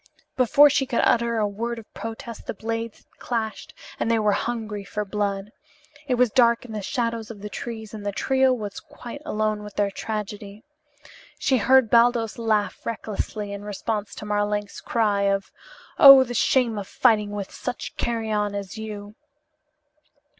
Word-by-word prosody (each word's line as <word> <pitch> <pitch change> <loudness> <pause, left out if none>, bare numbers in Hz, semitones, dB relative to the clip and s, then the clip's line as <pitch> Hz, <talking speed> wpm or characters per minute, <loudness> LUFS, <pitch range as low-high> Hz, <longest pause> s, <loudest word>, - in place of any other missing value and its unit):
Before 265 +3 +6
she 275 -2 +1
could 235 - +1
utter 235 0 +2
a 210 -1 +2
word 235 +4 -4
of 225 -2 -12
protest 225 0 -7
the - - -4
blades 225 +1 -5
had - - -35
clashed 225 -3 -4 0.2
and - - 0
they 230 - +3
were 210 -1 +2
hungry 215 -1 -3
for 210 +1 -4
blood. 200 0 -2 0.6
It 255 - +2
was 245 -2 +3
dark 235 -1 +3
in 235 - -10
the 215 -1 -4
shadows 230 0 -2
of 220 -3 -9
the 210 0 -7
trees 220 -2 -6
and 215 -2 -7
the 205 - -2
trio 265 +5 +2
were 215 -5 -2 0.2
quite 245 +4 -9
alone 215 0 -1
with 210 -1 -10
their 205 -1 +1
tragedy. 210 0 -6 0.7
She 265 - +2
heard 255 0 +4
Baldos 235 -1 +3
laugh 215 -4 0
recklessly 210 -2 -4
in 200 0 -7
response 210 0 -4
to - - -8
Marlanx's 205 0 -2
cry 205 -3 +1
of: 195 0 -1 0.5
"Oh, 275 -1 +11
the 245 -1 -6
shame 240 -2 +2
of 195 - -7
fighting 215 -4 +3
with 205 -2 -5
such 250 -1 -5
carrion 215 -3 -1
as 200 +1 -6
you!" 210 -1 -7
220 Hz, 170 wpm, -24 LUFS, 205-235 Hz, 0.7 s, Oh